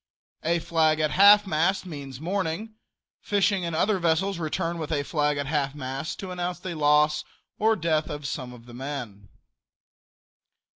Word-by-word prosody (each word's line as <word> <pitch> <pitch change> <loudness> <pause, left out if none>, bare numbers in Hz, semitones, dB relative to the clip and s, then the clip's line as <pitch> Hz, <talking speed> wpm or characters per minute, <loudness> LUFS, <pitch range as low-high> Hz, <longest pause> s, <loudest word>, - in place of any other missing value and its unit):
A 170 +2 +1
flag 160 -2 +2
at 155 -1 +1
half 205 +2 +7
mast 190 +3 +1
means 140 -6 -8
mourning. 190 +5 -2 0.5
Fishing 200 -2 +1
and 170 -2 -2
other 195 +4 +2
vessels 175 +3 +1
return 165 +1 -2
with 155 -1 -5
a 145 -2 0
flag 150 0 0
at 140 - -2
half 145 -1 -1
mast 135 +2 -4
to 190 -2 -6
announce 180 0 -3
the 180 0 -5
loss 150 0 +3 0.4
or 220 +1 +3
death 160 -4 0
of 145 -1 -6
some 130 -2 -4
of 120 -1 -13
the 120 - -13
men. 120 -7 -6
160 Hz, 160 wpm, -26 LUFS, 145-180 Hz, 0.5 s, half